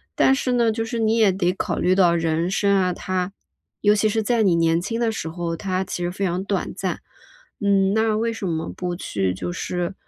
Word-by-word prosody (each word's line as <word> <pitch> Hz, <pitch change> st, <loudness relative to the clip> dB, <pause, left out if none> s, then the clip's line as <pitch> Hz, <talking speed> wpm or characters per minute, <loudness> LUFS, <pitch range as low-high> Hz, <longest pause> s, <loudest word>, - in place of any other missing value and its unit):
但 270 Hz, -, +4 dB
是 265 Hz, -1 st, -1 dB
呢 235 Hz, -2 st, +3 dB
就 225 Hz, +1 st, -2 dB
是 235 Hz, 0 st, -3 dB
你 220 Hz, 0 st, +2 dB
也 215 Hz, -4 st, +5 dB
得 180 Hz, -1 st, +1 dB
考 -, -, -2 dB
虑 185 Hz, +1 st, +3 dB
到 175 Hz, -3 st, +4 dB
人 165 Hz, +1 st, 0 dB
生 200 Hz, +1 st, +2 dB
啊 185 Hz, -2 st, +2 dB
它 185 Hz, +1 st, -3 dB, 0.5 s
尤 205 Hz, 0 st, +5 dB
其 215 Hz, +1 st, +2 dB
是 220 Hz, +1 st, 0 dB
在 235 Hz, +1 st, +1 dB
你 185 Hz, -4 st, +3 dB
年 165 Hz, 0 st, +2 dB
轻 230 Hz, +5 st, -3 dB
的 230 Hz, -1 st, +1 dB
时 190 Hz, -7 st, -4 dB
候， 170 Hz, 0 st, -3 dB
它 185 Hz, 0 st, -1 dB
其 180 Hz, -1 st, -4 dB
实 175 Hz, -, -1 dB
非 195 Hz, +2 st, -4 dB
常 180 Hz, +1 st, -1 dB
短 195 Hz, 0 st, -2 dB
暂。 -, -, -3 dB, 0.6 s
嗯， 195 Hz, -1 st, +3 dB
那 220 Hz, 0 st, +2 dB
为 230 Hz, +1 st, 0 dB
什 210 Hz, -4 st, -4 dB
么 160 Hz, -2 st, -2 dB
不 180 Hz, -1 st, -3 dB
去 100 Hz, -, -2 dB
就 95 Hz, -, -4 dB
是， 180 Hz, +1 st, -3 dB
190 Hz, 245 characters per minute, -22 LUFS, 175-220 Hz, 0.6 s, 也